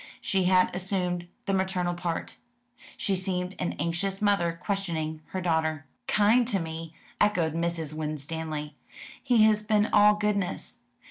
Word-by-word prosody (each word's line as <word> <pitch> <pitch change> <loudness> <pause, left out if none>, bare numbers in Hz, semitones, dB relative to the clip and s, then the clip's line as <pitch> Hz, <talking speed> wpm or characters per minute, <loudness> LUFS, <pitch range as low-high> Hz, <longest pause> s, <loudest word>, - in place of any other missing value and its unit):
She 190 -2 +1
had 185 0 +4
assumed 180 -2 -1 0.2
the 195 - 0
maternal 190 -2 0
part. 175 -1 -4 0.6
She 195 - 0
seemed 180 -1 -2
an 180 - -1
anxious 175 +5 -2
mother 175 -5 +1
questioning 165 -7 -2
her 185 - -4
daughter. 160 -3 0 0.2
"Kind 225 +4 +4
to 215 -5 +2
me," 160 -1 -6 0.2
echoed 175 -7 +2
Mrs. 165 -2 -2
Winstanley. 155 0 -4 0.5
"He 235 -3 +4
has 215 -1 +4
been 210 0 +2
all 210 0 +7
goodness. 205 -3 -2
180 Hz, 135 wpm, -28 LUFS, 160-200 Hz, 0.6 s, all